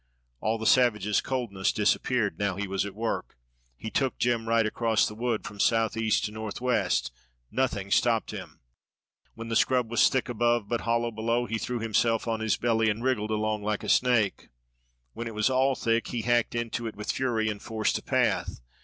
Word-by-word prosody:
All 110 - 0
the 110 - -5
savage's 105 -5 +3
coldness 115 -8 -1
disappeared 105 -2 0
now 100 -2 0
he 100 +1 -3
was 95 +1 -1
at 100 - -9
work. 110 - -3 0.4
He 110 - -6
took 135 -2 0
Jem 115 -2 0
right 115 -1 +3
across 110 0 +1
the - - -6
wood 115 0 -2
from 100 - -8
southeast 115 -1 +2
to 105 - -4
northwest. 110 - -1 0.4
Nothing 100 -7 -1
stopped 115 0 +2
him. - - -9 0.7
When 115 0 -7
the 115 - -1
scrub 125 -1 +2
was 120 - +5
thick 130 - -1
above 120 -2 +1
but 120 +2 -1
hollow 115 0 0
below 115 +2 0
he 115 0 -3
threw 125 +3 -3
himself 115 +1 +1
on 115 -1 -1
his 110 -1 0
belly 115 -2 +2
and 110 +3 -2
wriggled 120 -5 0
along 110 0 -1
like 105 0 -2
a - - -4
snake. 120 -5 +2 0.6
When 115 - -5
it 115 - -7
was 110 +4 +2
all 130 +1 +2
thick, 115 -1 0
he 120 -3 -3
hacked 120 0 +1
into 120 0 -2
it 110 - -6
with 105 +1 -3
fury 115 -4 0
and 105 -2 -3
forced 110 -2 -1
a - - -15
path. - - 0
115 Hz, 190 wpm, -27 LUFS, 105-120 Hz, 0.7 s, was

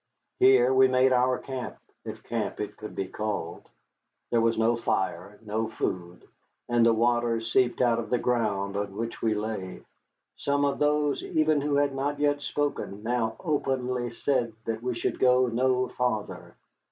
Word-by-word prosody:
Here 130 -1 +5
we 130 0 +6
made 130 0 +3
our 125 0 +3
camp, 130 -2 -6 0.3
if 110 0 -7
camp 115 -2 -3
it 105 0 -4
could 105 - -9
be 95 - -2
called. 105 -4 -4 0.6
There 115 - +3
was 115 0 +2
no 115 +1 +3
fire, 95 -3 -2
no 110 +1 -2
food, 90 -5 -4 0.4
and 120 -1 +3
the 115 - +6
water 120 0 +2
seeped 120 +3 +1
out 120 -2 +3
of 115 - -5
the 125 - +2
ground 105 -5 -1
on 100 -1 -3
which 115 +1 -4
we 110 -1 +1
lay. 105 -3 -5 0.5
Some 145 0 +1
of 140 -1 -1
those 150 -1 +1
even 155 -2 +1
who 145 0 0
had 140 -1 +2
not 140 +2 -2
yet 145 0 +1
spoken 145 -9 -3
now 115 -1 -1
openly 130 -6 -1
said 120 -1 -1
that 115 0 -3
we 125 -1 -3
could - - -2
go 125 0 +4
no 125 +1 +1
farther. 125 -4 -3
120 Hz, 165 wpm, -27 LUFS, 110-130 Hz, 0.6 s, we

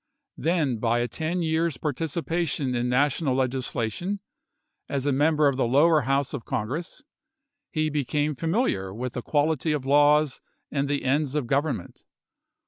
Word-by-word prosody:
Then 155 -7 +1
by 115 +1 +1
a 120 - 0
ten 170 +6 -2
years' 160 -2 0
participation 160 -1 -1
in 120 0 0
National 140 +1 +2
legislation 130 - -2 0.7
as 140 -1 -2
a 145 - +2
member 150 +2 +3
of 140 -2 +1
the 125 - +1
lower 150 +5 +5
House 135 +1 0
of 135 -5 -4
Congress, 150 - -4 0.7
he 155 -1 0
became 150 +1 0
familiar 160 - 0
with 120 +5 -5
the 125 - -3
quality 150 +2 +1
of 145 -3 -3
laws 145 0 +4 0.3
and 140 -1 0
the 145 -1 -1
ends 140 +1 +1
of 150 -4 0
government. 140 - -2
145 Hz, 145 wpm, -26 LUFS, 130-155 Hz, 0.7 s, lower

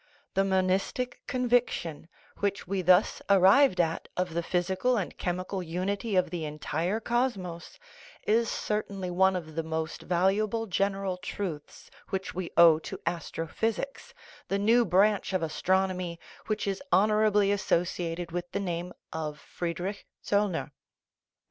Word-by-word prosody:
The 195 - +3
monistic 195 +6 0
conviction, 245 - 0 0.3
which 200 -1 -1
we 195 0 -1
thus 180 +2 +4
arrived 195 +3 +6
at, 165 -1 0
of 180 -2 -1
the 170 - 0
physical 185 +8 0
and 195 - -3
chemical 185 +2 -3
unity 190 +5 -2
of 185 - +2
the 175 -3 -3
entire 160 +6 -2
cosmos 215 -8 -2 0.5
is 225 +2 +3
certainly 200 -3 -2
one 190 +1 +3
of 160 -3 -5
the 165 - -1
most 160 0 -4
valuable 200 +5 +1
general 195 -1 -1
truths 180 -4 -6 0.2
which 190 0 -3
we 180 -1 -4
owe 165 -2 +8
to - - -7
astrophysics, 175 - -3 0.3
the 195 - 0
new 230 +4 +4
branch 200 +1 +3
of 185 -3 +1
as 155 -1 -4
tronomy 185 -2 +1 0.3
which 215 -1 -1
is 195 +3 -2
honorably 210 0 +4
associated 175 -3 -1
with 175 0 -4
the 200 - 0
name 175 -2 -3 0.2
of 155 -2 -4
Friedrich 180 +4 -4 0.2
Zollner. 200 -7 0
185 Hz, 135 wpm, -29 LUFS, 170-205 Hz, 0.5 s, owe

